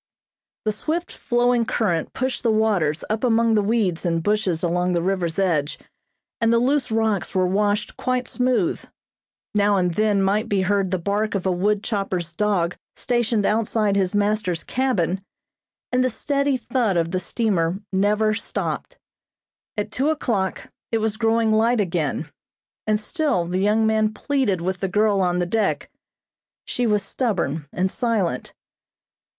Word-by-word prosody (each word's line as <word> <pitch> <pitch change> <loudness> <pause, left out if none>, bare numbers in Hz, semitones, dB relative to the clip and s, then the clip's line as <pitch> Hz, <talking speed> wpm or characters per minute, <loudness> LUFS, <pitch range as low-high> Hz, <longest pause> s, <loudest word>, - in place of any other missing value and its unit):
The 215 - +2
swift 320 +11 -2
flowing 240 -1 +1
current 190 -8 -1
pushed 260 -1 -2
the 235 - +1
waters 200 -8 +1
up 215 +2 -2
among 230 -2 +3
the 215 - +4
weeds 200 -5 0
and 165 -2 0
bushes 200 -5 0
along 180 +1 +1
the 170 - +1
river's 180 -3 -1
edge 165 -7 +1 0.6
and 230 0 +3
the 235 - +4
loose 265 +3 +1
rocks 220 -4 0
were 185 -1 +3
washed 205 +2 0
quite 255 -1 -1
smooth. 250 -7 0 0.7
Now 205 0 +3
and 180 -2 +1
then 210 0 +2
might 205 +3 +1
be 195 -2 +1
heard 195 0 +1
the 185 - 0
bark 205 +4 -1
of 195 - -2
a 190 - +2
wood 200 +4 +1
chopper's 185 -6 -2
dog 180 -3 0 0.2
stationed 235 -4 0
outside 215 -1 +1
his 195 0 +1
master's 205 -4 0
cabin, 195 -9 0 0.7
and 250 0 +2
the 255 - +2
steady 280 +2 0
thud 235 -7 0
of 165 0 0
the 185 - 0
steamer 185 -3 0
never 210 +3 +2
stopped. 220 - -4 0.8
At 210 0 -2
two 275 +6 0
o'clock 220 -11 -1 0.2
it 225 - +2
was 220 -1 0
growing 225 0 +2
light 225 +2 +3
again, 170 -7 -1 0.6
and 215 0 +2
still 275 - 0
the 180 +2 -2
young 210 +3 +2
man 220 -1 +2
pleaded 255 - 0
with 185 +1 -2
the 195 - -1
girl 205 0 +2
on 180 -1 +1
the 175 - +1
deck. 210 +3 -1 0.7
She 245 -1 -1
was 210 -2 +2
stubborn 175 - -2
and 185 +1 -1
silent. 210 - -1
210 Hz, 155 wpm, -22 LUFS, 185-225 Hz, 0.8 s, the